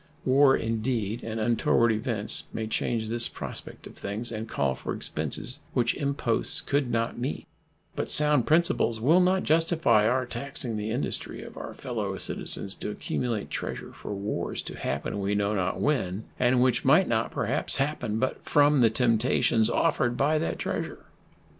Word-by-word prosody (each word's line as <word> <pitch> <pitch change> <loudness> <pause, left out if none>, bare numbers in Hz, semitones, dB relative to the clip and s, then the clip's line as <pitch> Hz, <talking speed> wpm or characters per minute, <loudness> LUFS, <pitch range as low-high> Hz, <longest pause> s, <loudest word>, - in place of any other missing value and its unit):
War, 135 +1 +5
indeed, 115 -1 -2
and 110 0 -4
untoward 115 +1 +2
events 110 -1 -1
may 110 - -3
change 110 0 -1
this 115 +1 +1
prospect - - -8
of - - -11
things 110 +4 -4
and 110 0 -5
call 70 -8 0
for - - -5
expenses 130 +4 -3
which 120 -2 +2
imposts 140 -5 +3
could 140 -3 0
not 115 0 -1
meet; 130 +4 -4 0.5
but - - -3
sound 150 -4 +6
principles 160 - +2
will 155 +10 +4
not 185 +1 +2
justify 160 -9 +3
our 130 +2 +1
taxing 125 -1 -3
the 105 0 -3
industry 120 +5 -4
of - - -11
our - - -8
fellow - - -4
citizens 95 - -1
to - - -6
accumulate 110 +1 -3
treasure - - -5
for 105 - -7
wars 100 +2 -3
to - - -7
happen 70 +9 -3
we 100 +1 -1
know 100 +1 0
not 95 -2 -1
when, 110 -9 -1 0.2
and 125 0 +3
which 125 -2 +2
might 155 +8 +4
not, 115 0 0
perhaps, - - -2
happen 135 -6 -2
but 130 +3 -2
from 145 -2 +3
the 115 - +5
temptations 115 -1 +2
offered 125 -7 +1
by 155 +3 +2
that 165 - -2
treasure. - - -4
120 Hz, 165 wpm, -27 LUFS, 110-140 Hz, 0.5 s, sound